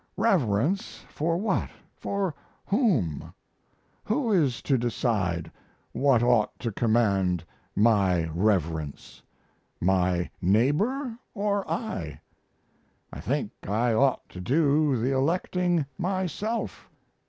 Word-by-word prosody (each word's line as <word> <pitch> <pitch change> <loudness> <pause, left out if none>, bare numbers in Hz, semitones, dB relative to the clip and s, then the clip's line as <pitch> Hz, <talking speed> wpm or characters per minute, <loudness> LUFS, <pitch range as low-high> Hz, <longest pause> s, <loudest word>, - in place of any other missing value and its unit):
Reverence 180 - +1
for 165 +2 -1
what 195 0 0 0.3
for 200 -4 -2 0.3
whom? 165 - +1 0.7
Who 230 +1 0
is 150 -11 +2
to 140 - +2
decide 105 -9 -1 0.4
what 135 -4 +3
ought 120 -3 +2
to 115 - -2
command 100 -6 +1 0.3
my 100 -6 +3
reverence 85 -6 -1 0.6
my 90 -1 +1
neighbor 205 - +1 0.2
or 205 -1 -1
I? 90 - -4 0.9
I - - -7
think - - -2 0.2
I 115 +4 +1
ought 135 +3 +2
to 90 - -9
do 145 - +2
the 120 +4 0
electing 175 +3 +1
myself. 190 +4 -2
130 Hz, 95 wpm, -27 LUFS, -, 0.9 s, what